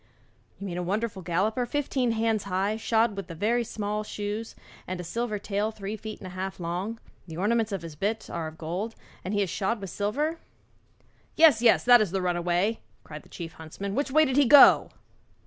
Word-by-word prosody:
'You 200 - -7
mean 180 -2 -4
a - - -1
wonderful 205 +2 -2
galloper 190 +8 0
fifteen 265 -3 0
hands 225 -2 0
high, 195 +2 0
shod 225 0 +1
with 195 -3 -6
very 215 +8 0
small 210 -1 -3
shoes, 210 +2 -5 0.3
and 185 - -3
with 230 +7 -3
a 210 - -2
tail 205 +1 -1
three 210 -1 -6
feet 215 0 -8
and - - -10
a 185 - -7
half 190 +1 -5
long? 180 +7 -4 0.3
The 160 -1 -8
ornaments 220 +3 +1
of 195 -4 -3
his 165 -2 -8
bit 210 +8 -2
are 165 -2 -4
of 155 0 -10
gold 180 +8 -4 0.3
and 185 - -4
he 205 -1 +1
is 190 - -4
shod 215 +4 -1
with 195 -3 -7
silver?' 295 +11 -1 1.0
'Yes, 310 -8 +6
yes, 235 -2 +5
that 245 -1 +7
is 210 - +1
the 190 +3 -1
runaway,' 180 +4 0 0.2
cried 150 0 -9
the - - -21
chief 165 -1 -8
huntsman; 175 +5 -7
'which 285 +5 -1
way 310 +3 +5
did 265 -1 -1
he 285 - +6
go?' 280 +3 +8
205 Hz, 200 wpm, -27 LUFS, 185-225 Hz, 1.0 s, go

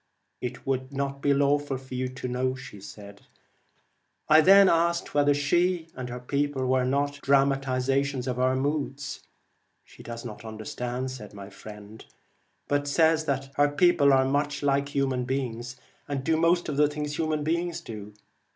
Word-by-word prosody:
' - - -50
It 120 0 -11
would 130 0 -2
not 140 0 -3
be 145 - +2
lawful 140 0 +2
for 130 0 -12
you 130 0 -1
to 130 0 -6
know.' 130 +1 -1 1.7
I 155 +1 +7
then 195 +3 +7
asked 170 0 +1
whether 145 0 +3
she 170 +4 +1
and 125 -1 -6
her 125 0 -5
people 140 +1 -1
were 130 0 +2
94 125 - 0
not 140 +1 -1
'dramatizations 135 -1 +1
of 125 -1 -2
our 130 +1 +2
moods 140 0 -2 0.3
'? - - -46
'She - - -16
Regina, 120 - -7
does 115 - -9
not 110 -2 -8
understand,' 120 +4 -4
said 105 -5 -10
my 100 0 -9
friend, 105 +2 -11 0.6
'but 145 0 0
pigmeorum, - - -7
says 160 +2 +3
that 135 -2 -2
her 145 0 +4
people 145 -1 +4
are 130 -1 +4
much 145 +2 -1
like 140 0 +1
human 135 -2 0
Vem 125 - -2
* 130 +2 0
beings, 120 -2 -5 0.3
and 140 -2 -3
do 160 +3 +2
most 170 +2 +2
of 145 - -3
the 150 0 +5
things 150 0 -4
human 155 -2 0
beings 170 +2 -1
do.' 105 -2 -9
140 Hz, 180 wpm, -27 LUFS, 130-145 Hz, 1.7 s, I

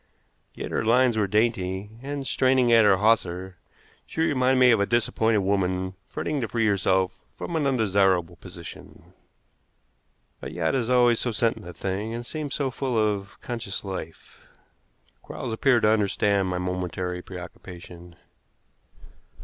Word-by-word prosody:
Yet - - -6
her - - 0
lines 120 +1 +4
were 105 -2 +1
dainty, 105 -2 0
and, 140 0 -5
straining 130 -2 +3
at 115 -2 +7
her 100 -2 +5
hawser, 95 -4 +1 0.5
she - - -3
reminded 130 -4 +2
me 125 -1 +7
of 115 - +4
a 100 - +1
disappointed 115 -2 +1
woman 95 -1 0
fretting 150 -2 -3
to 115 - -1
free 115 -1 0
herself 95 -2 +1 0.2
from 170 - -5
an 150 -3 +1
undesirable 95 -8 +2
position. 90 -2 -11 1.3
A - - -6
yacht 80 -1 -1
is 125 -3 0
always 120 -2 +4
so 125 - -1
sentient 115 -4 -1
a 90 - -8
thing, 100 +6 -3
and 120 0 -6
seems 150 +1 -4
so 135 -3 -1
full 130 -2 -2
of 105 -2 -1
conscious 115 -5 -5
life. 95 -5 -8 0.8
Quarles 115 - -6
appeared 120 +1 +3
to 105 - +5
understand 100 -2 +2
my 90 -1 -2
momentary 90 0 -3
preoccupation. 90 -1 -11
105 Hz, 145 wpm, -25 LUFS, 95-120 Hz, 1.3 s, at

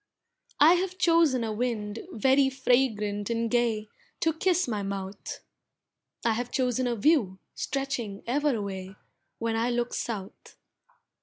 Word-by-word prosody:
I 310 +4 +8
have 370 -1 -4
chosen 330 -8 +4
a 220 -1 -2
wind 215 -2 -2
very 265 +4 +3
fragrant 225 -6 +1
and 230 -1 -1
gay, 230 -3 +1 0.3
To 325 -1 +2
kiss 360 +1 +1
my 215 -4 -2
mouth. 195 0 -5 0.8
I 230 - +4
have 240 +2 -3
chosen 250 -1 0
a 240 - 0
view, 225 - +2 0.2
stretching 255 -7 -3
ever 285 +2 +1
away, 195 -2 -5 0.4
When 230 0 -1
I 230 +2 +1
look 240 0 -1
south. 205 -5 -6
235 Hz, 135 wpm, -28 LUFS, 210-270 Hz, 0.8 s, I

